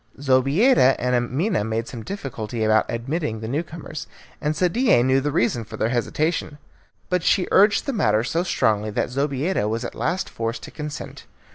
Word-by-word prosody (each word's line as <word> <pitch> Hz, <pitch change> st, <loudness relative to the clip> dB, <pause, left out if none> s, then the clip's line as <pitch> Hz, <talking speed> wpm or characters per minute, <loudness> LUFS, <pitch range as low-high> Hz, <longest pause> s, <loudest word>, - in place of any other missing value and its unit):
Zobeida 135 Hz, -, +4 dB
and 125 Hz, +1 st, -1 dB
Amina 125 Hz, -, 0 dB
made 110 Hz, +1 st, -2 dB
some 120 Hz, -, -7 dB
difficulty 120 Hz, -, -5 dB
about 110 Hz, 0 st, +3 dB
admitting 120 Hz, 0 st, -2 dB
the 110 Hz, -, -6 dB
new 140 Hz, +7 st, 0 dB
comers, 165 Hz, -2 st, -8 dB, 0.3 s
and 150 Hz, +1 st, 0 dB
Sadie 180 Hz, -, +3 dB
knew 130 Hz, +1 st, +3 dB
the 145 Hz, +2 st, -1 dB
reason 120 Hz, -2 st, +1 dB
of 110 Hz, -, -6 dB
their 110 Hz, -, 0 dB
hesitation. 150 Hz, +5 st, -1 dB, 0.5 s
But 180 Hz, -1 st, +1 dB
she 180 Hz, +2 st, +2 dB
urged 205 Hz, +2 st, +4 dB
the 275 Hz, -, -2 dB
matter 110 Hz, -, +2 dB
so 165 Hz, +7 st, 0 dB
strongly 110 Hz, -, +1 dB
that 105 Hz, -, -2 dB
Zobeida 140 Hz, -, 0 dB
was 115 Hz, +2 st, -2 dB
at -, -, -5 dB
last 185 Hz, +1 st, -1 dB
forced 115 Hz, +1 st, -4 dB
to -, -, -9 dB
consent. 150 Hz, -1 st, -7 dB
135 Hz, 175 wpm, -23 LUFS, 115-165 Hz, 0.5 s, Zobeida